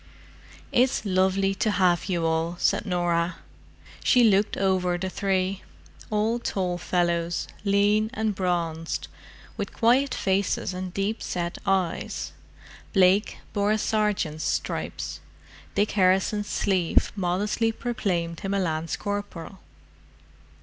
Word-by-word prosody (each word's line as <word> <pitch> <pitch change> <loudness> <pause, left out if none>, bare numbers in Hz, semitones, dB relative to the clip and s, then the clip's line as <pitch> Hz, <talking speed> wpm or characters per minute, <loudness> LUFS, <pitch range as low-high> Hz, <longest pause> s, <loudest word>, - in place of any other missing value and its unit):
"It's 250 -2 +2
lovely 190 0 +2
to 215 +3 0
have 180 -4 +2
you 175 -4 -1
all," 165 +1 0
said 210 - +1
Norah. 175 -1 0 0.7
She 250 - +5
looked 205 -2 +3
over 185 -2 +1
the 185 +1 -3
three—all 200 +4 -2
tall 180 -6 -2
fellows, 170 -1 0 0.2
lean 205 +2 +3
and 220 -1 -1
bronzed, 170 -3 -2 0.5
with 205 -2 -3
quiet 250 +4 +3
faces 190 -1 0
and 185 0 -5
deep 200 +4 -2
set 175 0 -3
eyes, 190 -3 -1 0.6
Blake 190 +1 +4 0.2
bore 205 0 +1
a - - +2
sergeant's 210 -8 0
stripes; - - -3 0.6
Dick 205 +1 +2
Harrison's 195 +2 +2
sleeve 185 -5 +1
modestly 205 +4 0
proclaimed 180 -8 -2
him 195 0 -2
a - - +1
lance 160 -3 -1
corporal. 205 -3 -5
190 Hz, 115 wpm, -26 LUFS, 175-205 Hz, 0.7 s, She